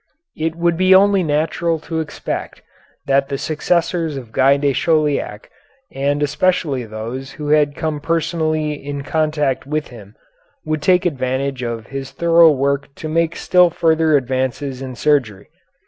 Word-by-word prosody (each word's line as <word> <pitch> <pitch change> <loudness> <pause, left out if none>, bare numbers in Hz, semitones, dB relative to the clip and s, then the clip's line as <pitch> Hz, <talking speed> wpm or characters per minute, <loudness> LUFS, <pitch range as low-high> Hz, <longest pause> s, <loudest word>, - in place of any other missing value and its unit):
It 160 +1 -2
would 170 0 +1
be 185 +1 +5
only 200 0 +5
natural 160 +1 0
to 160 0 -4
expect 160 - -5 0.4
that 135 0 +1
the 140 - -2
successors 165 +1 -1
of 120 -4 -9
Guy 135 +3 +4
de 140 -1 +1
Chauliac, 150 -8 0 0.4
and 145 +2 -1
especially 145 -4 0
those 115 +5 -7
who 150 -1 -6
had 150 -1 +3
come 155 -2 -3
personally 155 -1 -1
in 145 -1 -6
contact 150 -4 -1
with 150 +1 -2
him, 110 -3 -13 0.5
would 155 -1 -2
take 180 +3 +3
advantage 130 -3 -2
of 115 -2 -4
his 135 +1 -6
thorough 170 +2 +5
work 140 -1 0
to 155 - -6
make 165 +1 0
still 180 -1 +4
further 160 -2 +2
advances 130 +1 -2
in 130 -1 -6
surgery. 120 -9 0
150 Hz, 145 wpm, -19 LUFS, 135-165 Hz, 0.5 s, be